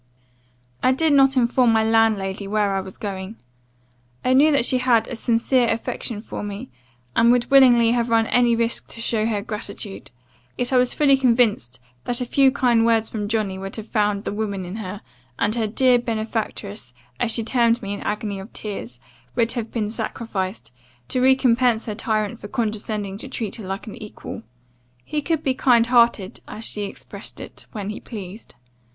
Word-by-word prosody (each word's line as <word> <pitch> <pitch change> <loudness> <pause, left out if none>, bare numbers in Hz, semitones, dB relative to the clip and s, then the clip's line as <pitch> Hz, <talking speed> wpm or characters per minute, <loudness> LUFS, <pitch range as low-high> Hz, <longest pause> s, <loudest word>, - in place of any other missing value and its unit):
"I 255 - +4
did 315 +2 +2
not 270 -1 +5
inform 245 0 +3
my 220 0 +3
landlady 215 -3 +1
where 205 -1 +1
I 195 - 0
was 190 0 -10
going. 195 0 -5 0.9
I 255 - +3
knew 290 +4 +6
that 280 -5 +3
she 255 - +2
had 245 -3 +3
a 250 - -5
sincere 235 +2 +2
affection 225 -1 -3
for - - -6
me, 205 -8 -6 0.4
and 235 +1 +5
would 245 0 +1
willingly 245 -4 +6
have 240 0 0
run 225 -1 +3
any 240 0 +3
risk 230 0 +1
to - - -11
show 225 -1 0
her 210 -3 -1
gratitude; 210 -2 -7 0.5
yet 245 +1 -2
I - - +5
was 250 0 +2
fully 285 -3 +5
convinced, 235 - +2 0.3
that 245 0 -1
a 250 - -2
few 270 +2 +4
kind 240 -4 +3
words 225 -1 +2
from 210 -2 -3
Johnny 205 -3 -1
would 195 0 -5
have 220 - -6
found 210 -2 0
the - - -3
woman 200 -3 -3
in 180 +4 -6
her, 205 -1 -6 0.4
and 205 +1 +1
her 225 -2 0
dear 250 +3 +3
benefactress, 220 - -4 0.2
as 230 - +1
she 230 - +3
termed 235 0 +2
me 200 0 -3
in 200 - -5
an - - -6
agony 210 -1 -3
of 195 +5 -10
tears, 125 - -6 0.4
would 230 -2 +2
have 230 -3 -4
been 215 -3 -2
sacrificed, 215 - -4 0.4
to 255 - 0
recompense 250 -3 +3
her 215 - -3
tyrant 215 -1 -2
for - - -8
condescending 210 -3 -3
to 270 - -6
treat 225 -6 -4
her 210 -5 -8
like 195 +2 -4
an 215 - -9
equal. 210 - -8 0.6
He 300 - -2
could 320 +1 -1
be 265 - +1
kind 240 -3 +4
hearted, 235 -5 +2
as 220 +1 -6
she 205 -1 -1
expressed 200 - -8
it, - - -11
when 205 -2 -4
he 210 - -7
pleased. 205 - -9
225 Hz, 190 wpm, -22 LUFS, 205-245 Hz, 0.9 s, knew